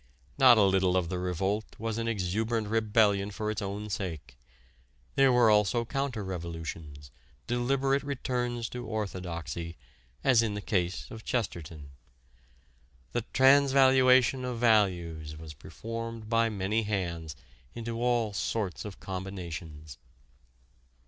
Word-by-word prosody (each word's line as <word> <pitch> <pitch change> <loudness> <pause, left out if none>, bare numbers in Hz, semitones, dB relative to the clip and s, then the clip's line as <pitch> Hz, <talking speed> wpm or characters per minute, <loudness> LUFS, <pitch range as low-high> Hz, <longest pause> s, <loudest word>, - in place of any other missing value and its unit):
Not 130 -3 +8
a 105 - +6
little 95 -1 +3
of 85 -3 0
the 90 -1 -2
revolt 95 +4 -2
was 115 0 -3
an 115 - -2
exuberant 110 +2 -1
rebellion 105 -2 +2
for 105 +1 -3
its 110 +1 -4
own 100 +2 -4
sake. 80 -11 -5 0.8
There 135 -1 +5
were 120 -3 +5
also 105 +3 +3
counter 135 -4 -2
revolutions, 80 -6 -6 0.3
deliberate 135 +3 +1
returns 125 -4 -2
to 125 0 -6
orthodoxy, 85 - -4 0.5
as 130 -4 +5
in 110 -3 -1
the - - -3
case 90 -3 -1
of 110 0 -9
Chesterton. 80 - -4 1.2
The 120 -1 -2
transvaluation 130 -2 +5
of 125 -1 -3
values 85 -9 +1
was 80 -1 -9
performed 115 - -7
by 115 0 +2
many 105 +1 0
hands 85 -7 -3 0.4
into 115 0 -4
all 120 -3 +1
sorts 100 -1 -2
of 100 -2 -8
combinations. 85 -7 -7
105 Hz, 120 wpm, -29 LUFS, 90-120 Hz, 1.2 s, Not